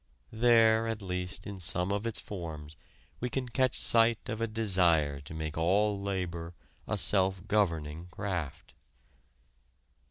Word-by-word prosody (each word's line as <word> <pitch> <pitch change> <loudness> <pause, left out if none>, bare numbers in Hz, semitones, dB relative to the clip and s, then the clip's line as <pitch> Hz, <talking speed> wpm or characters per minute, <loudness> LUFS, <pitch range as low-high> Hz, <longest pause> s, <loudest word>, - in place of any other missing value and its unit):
There 115 -1 +4
at 110 -2 -3
least 90 0 -4
in 100 -1 -7
some 90 +2 0
of 100 +3 -1
its 115 - -3
forms, 80 -6 -7 0.4
we 125 - -2
can 130 0 -2
catch 130 +1 0
sight 115 0 +3
of 110 +1 -3
a 115 - +1
desire 90 -10 +2
to 70 - -10
make 80 0 -4
all 100 +4 +2
labor 90 -4 -4 0.3
a - - 0
self 95 -1 +1
governing 85 -6 0
craft. 90 -5 -5
95 Hz, 135 wpm, -30 LUFS, 85-110 Hz, 0.4 s, There